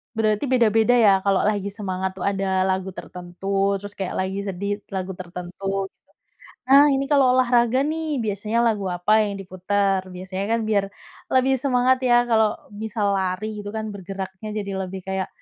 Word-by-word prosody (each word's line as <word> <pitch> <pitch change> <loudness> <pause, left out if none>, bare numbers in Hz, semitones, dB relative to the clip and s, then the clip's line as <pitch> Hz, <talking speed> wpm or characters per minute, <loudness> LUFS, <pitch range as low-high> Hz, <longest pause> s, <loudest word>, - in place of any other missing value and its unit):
Berarti 215 +2 +1
beda-beda 235 -2 +3
ya 225 -4 +6
kalau 195 -1 +3
lagi 205 -1 0
semangat 190 -2 -3
tuh 190 - -6
ada 195 -1 +1
lagu 190 0 -1
tertentu 195 +3 -2
terus 205 0 -8
kayak 190 -2 -3
lagi 190 +1 -2
sedih 200 +2 -3
lagu 190 0 -3
tertentu 185 +2 -4
gitu, - - -38 0.6
nah 275 +2 +8
ini 270 0 +1
kalau 275 -4 +4
olahraga 245 0 +3
nih 310 -3 -2
biasanya 210 +2 -1
lagu 210 -4 +1
apa 215 +5 +3
yang 205 -1 -3
diputer? 195 +1 0
Biasanya 185 +2 -5
kan 230 - +2
biar 200 -2 +2 0.5
lebih 260 +1 +4
semangat 260 -1 +2
ya 240 -1 +5
kalau 220 -2 +3 0.2
bisa 220 +1 -5
lari 190 0 0 0.2
gitu 205 - -6
kan 220 0 -4
bergeraknya 190 +1 -7
jadi 200 -1 -4
lebih 190 0 -6
kayak, 190 0 -2
200 Hz, 165 wpm, -23 LUFS, 190-225 Hz, 0.6 s, nah